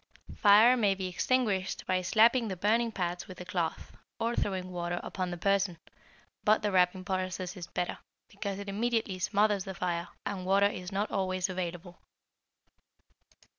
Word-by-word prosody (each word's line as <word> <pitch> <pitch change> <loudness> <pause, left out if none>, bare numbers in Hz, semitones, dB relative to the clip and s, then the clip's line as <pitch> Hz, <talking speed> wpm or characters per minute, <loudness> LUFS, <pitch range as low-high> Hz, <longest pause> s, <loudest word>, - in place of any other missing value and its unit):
Fire 215 +4 +7
may 205 -5 +2
be 190 -1 -4
extinguished 195 0 0
by 185 0 +1
slapping 230 +6 +4
the 190 - -3
burning 225 +5 +1
parts 175 -3 -3
with 185 - -10
a 180 - -7
cloth, 175 -3 -3 0.2
or 230 +1 0
throwing 185 -2 -2
water 175 0 -3
upon 185 -2 -3
the 175 - -5
person, 195 -1 +1 0.7
but 215 +1 +3
the 210 - +1
wrapping 185 0 +2
process 185 -1 -3
is 175 -3 -7
better, 180 0 -3 0.3
because 200 -1 -5
it 200 0 -7
immediately 220 -1 -1
smothers 205 0 +2
the 190 0 -7
fire, 170 -1 -2 0.2
and 195 -2 -3
water 195 +1 +4
is 185 -2 -2
not 200 +2 -1
always 185 -1 -1
available. 180 -1 -5
190 Hz, 160 wpm, -30 LUFS, 180-205 Hz, 0.7 s, Fire